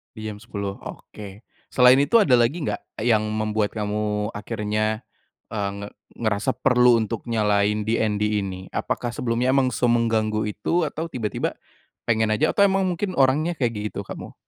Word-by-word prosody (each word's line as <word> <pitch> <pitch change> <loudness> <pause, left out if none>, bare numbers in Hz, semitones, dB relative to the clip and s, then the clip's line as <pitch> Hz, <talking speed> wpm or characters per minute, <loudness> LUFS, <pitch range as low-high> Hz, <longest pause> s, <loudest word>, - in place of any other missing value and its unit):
Di 110 0 -5
jam 105 - -8
10, 100 -3 -5
oke. 105 +1 -10 0.2
Selain 125 +1 +5
itu 145 +11 +1
ada 125 -7 +4
lagi 140 +8 +1
nggak? 110 - -5
Yang 110 -3 +3
membuat 110 0 -1
kamu 105 0 -2
akhirnya, 110 +1 -2 0.5
eee, 100 -3 -2
nge 100 - -6 0.3
ngerasa 110 -2 0
perlu 125 -2 +4
untuk 110 +2 -5
nyalain 105 -2 +1
DND 110 -1 0 0.2
ini? 95 -1 -5
Apakah 120 - -2
sebelumnya 120 +1 0
emang 130 -1 +2
semengganggu 115 -3 +1
itu? 155 - 0
Atau 160 +2 -5
tiba-tiba 110 -4 -3 0.5
pengen 110 -2 +2
aja? 150 +9 +1
Atau 200 - +3
emang 195 -1 +3
mungkin 185 -1 -2
orangnya 150 +6 +2
kayak 120 -4 0 0.2
gitu - - -5
kamu? - - -8
110 Hz, 155 wpm, -23 LUFS, 105-125 Hz, 0.5 s, Selain